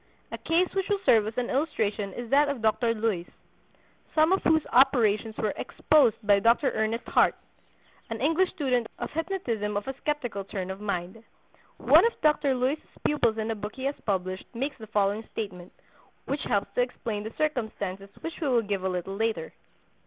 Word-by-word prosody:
A - - -4
case 340 +3 +2
which 385 0 -1
will 410 - +2
serve 220 - +5
as 220 - -6
an 245 -1 -1
illustration 220 -8 -1
is 240 -1 -7
that 285 +1 +5
of 265 -5 -4
Dr. 230 +1 +2
Luys, 210 -6 -1 0.9
some 315 +2 +4
of 380 - +3
whose 315 -1 +3
operations 225 -4 +3
were 215 - -1
"exposed" 280 -8 +3
by 205 -1 +5
Dr. 235 +6 +3
Ernest 220 +2 -1
Hart, - - +3 0.7
an 225 -1 -4
English 325 +8 +2
student 250 -6 0
of 240 - -5
hypnotism 275 - -2
of 205 - -4
a 270 - -2
skeptical 245 -10 -3
turn 190 -1 -5
of 190 +2 -8
mind. 195 +1 -4 0.5
One - - +6
of 470 - -5
Dr. 300 -3 +3
Luys's 260 +5 0 0.2
pupils 235 -7 +2
in 220 0 -1
a - - -2
book 210 0 -6
he 260 - -7
has 280 +1 0
published 185 -1 -2
makes 275 +5 -2
the 220 - -9
following 205 0 +1
statement, 185 -5 -6 0.5
which 280 +1 -2
helps 200 -1 -1
to - - +2
explain 230 -4 -3
the 220 +2 -7
circumstances 215 -9 -2
which 330 +1 -6
we 305 - 0
will 240 -3 +3
give 200 -2 -2
a 190 - 0
little 180 +1 -3
later. 220 -6 -2
225 Hz, 185 wpm, -27 LUFS, 205-280 Hz, 0.9 s, One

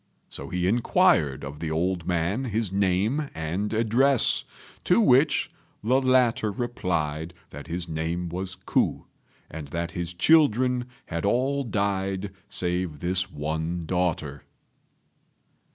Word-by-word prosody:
So - - -7
he 90 0 -1
inquired 80 - +3
of 70 +1 -7
the 80 - -3
old 85 +2 -1
man 90 +9 0
his 110 -4 -1
name 100 +10 +1
and 85 +6 -2
address, 115 +4 +3 0.4
to 180 - +4
which 150 - +4 0.3
the 130 +5 +3
latter 125 -4 +3
replied 85 -8 -2 0.2
that 75 +3 -9
his 85 +1 -4
name 80 +2 -2
was 95 +2 -4
Ku, 95 - 0 0.5
and 80 -2 -7
that 85 +3 -3
his 90 -1 -4
children 125 - +4 0.2
had 85 0 -4
all 130 +7 +1
died 100 -3 -1 0.2
save 90 -4 -1
this 90 +3 0
one 80 +3 -3
daughter. 80 -5 -1
95 Hz, 120 wpm, -26 LUFS, 85-115 Hz, 0.5 s, to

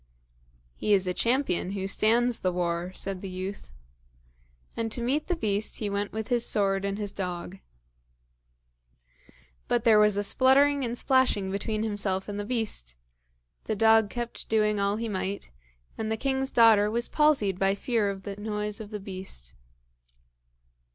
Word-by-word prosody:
"He 210 - +2
is 190 -1 +2
a 180 - -1
champion 230 -5 0
who 195 -1 -3
stands 235 +4 +2
the 185 - 0
war," 175 0 -2
said 195 -2 -4
the 195 - -6
youth. 185 - -6 1.1
And 225 -1 -2
to 240 - -1
meet 265 +6 -1
the 355 - 0
beast 210 -7 -1
he 205 -2 -3
went 200 0 -2
with 220 +1 -5
his 240 -2 +2
sword 195 -3 +1
and 200 0 -2
his 205 -2 -3
dog. 180 -1 -5 2.1
But 235 - +1
there 220 -3 +6
was 210 -1 +4
a 205 - 0
spluttering 275 +5 +4
and 235 -1 -2
a - - -4
splashing 250 -7 +2
between 215 +2 -2
himself 200 -3 -2
and 205 0 -5
the 205 - -3
beast! 215 - -3 0.7
The 220 - -1
dog 220 0 +4
kept 240 0 -6
doing 210 -1 +2
all 200 +1 +1
he 230 +1 -3
might, 195 - -4 0.5
and 220 0 -2
the 220 - 0
king's 265 +2 -1
daughter 220 -3 +5
was 235 +2 -1
palsied 270 - +2
by 195 0 +2
fear 220 -1 0
of 195 -1 -6
the 200 -1 -6
noise 210 0 -3
of 210 - -8
the 210 -1 -5
beast! 185 - -7
210 Hz, 165 wpm, -27 LUFS, 195-230 Hz, 2.1 s, there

